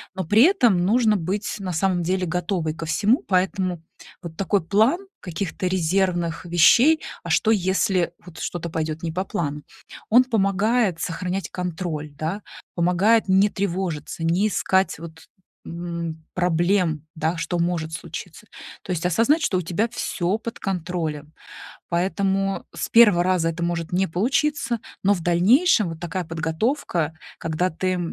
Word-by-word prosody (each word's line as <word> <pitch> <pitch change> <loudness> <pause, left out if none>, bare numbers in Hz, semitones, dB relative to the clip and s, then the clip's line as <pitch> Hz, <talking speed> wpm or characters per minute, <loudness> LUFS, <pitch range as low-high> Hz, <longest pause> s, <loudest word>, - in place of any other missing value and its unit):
но 190 - -3
при 210 +8 +5
этом 255 - +4
нужно 215 +2 +3
быть 195 +3 -2
на 190 -2 -4
самом 180 +1 +1
деле 185 +2 0
готовой 175 -2 -2
ко 165 +1 -6
всему, 210 - +2
поэтому 185 -2 0 0.4
вот 170 -3 -8
такой 195 +2 +1
план 235 - +2
каких-то 185 +1 -3
резервных 175 -2 0
вещей- 230 - +5 0.2
а - - -7
что, 220 - +3
если 190 -2 +1
вот 175 -2 -12
что-то 170 -1 -4
пойдёт 160 0 -3
не 165 - -2
по 185 +3 -1
плану,- 150 -5 -3 0.5
он 245 +4 +7
помогает 210 -3 +1
сохранять 180 +4 -3
контроль, 165 -4 -4
да. 165 +7 -3 0.3
Помогает 185 +7 +3
не 190 +2 +5
тревожиться, 180 -6 -3
не 175 +6 +2
искать 190 -3 +1
вот, 160 -1 -11 0.4
м, 170 -2 -5
проблем, 175 -2 +1
да, 160 +1 -1
что 170 +1 -2
может 170 -2 -1
случиться. 160 - -8 0.3
То - - -18
есть 175 -1 -2
осознать, 230 - +3
что 190 - +1
у - - 0
тебя 180 +6 -1
всё 195 -4 -2
под 230 +1 -7
контролем, 165 -5 -3 0.6
поэтому 195 +2 0
с - - -3
1 210 -7 +6
раза 180 -2 +1
это 165 +1 -6
может 170 -1 -2
не 190 +2 +2
получиться, 240 - 0 0.2
но 200 - +4
в 195 - -1
дальнейшем 200 - +4
вот 165 -1 -8
такая 175 +1 -3
подготовка, 165 - -1 0.3
когда 165 +3 -1
ты, 185 +3 -1
180 Hz, 145 wpm, -23 LUFS, 165-200 Hz, 0.6 s, он